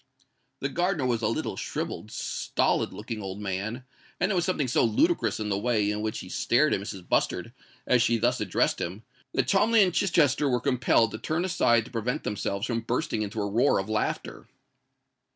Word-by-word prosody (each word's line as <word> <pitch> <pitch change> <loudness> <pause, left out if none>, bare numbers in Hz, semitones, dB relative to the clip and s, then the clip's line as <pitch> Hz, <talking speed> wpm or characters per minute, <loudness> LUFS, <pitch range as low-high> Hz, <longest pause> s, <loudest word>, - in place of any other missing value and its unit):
The 140 - -1
gardener 175 -2 0
was 120 -2 0
a 110 - +1
little, - - -2
shrivelled, - - -4
stolid - - -1
looking 110 0 -6
old 95 0 -6
man; 105 +5 -3 0.4
and 180 +4 +1
there - - +1
was 175 -1 +1
something 165 -7 0
so 125 - +2
ludicrous 320 - +2
in 105 -1 -2
the 100 -1 0
way 105 -3 +1
in 105 0 -3
which 110 0 -3
he - - -9
stared 150 +10 +2
at - - +1
Mrs. 100 -3 -7
Bustard - - 0 0.3
as 125 -1 +3
she 120 0 +3
thus 120 +3 +1
addressed - - +1
him, 95 +6 -5 0.3
that - - +1
Cholmondeley 215 +2 +4
and 180 -2 +1
Chichester 150 -7 +2
were 125 -1 +2
compelled 125 -4 +2
to 110 - -6
turn 160 +3 -1
aside 120 -11 +3
to - - -13
prevent 120 0 -2
themselves 100 0 -2
from 115 -1 -1
bursting 125 +1 -1
into 105 +1 -3
a - - -1
roar 115 +7 +3
of 95 +2 -3
laughter. 110 0 -2
120 Hz, 195 wpm, -27 LUFS, 105-150 Hz, 0.4 s, Cholmondeley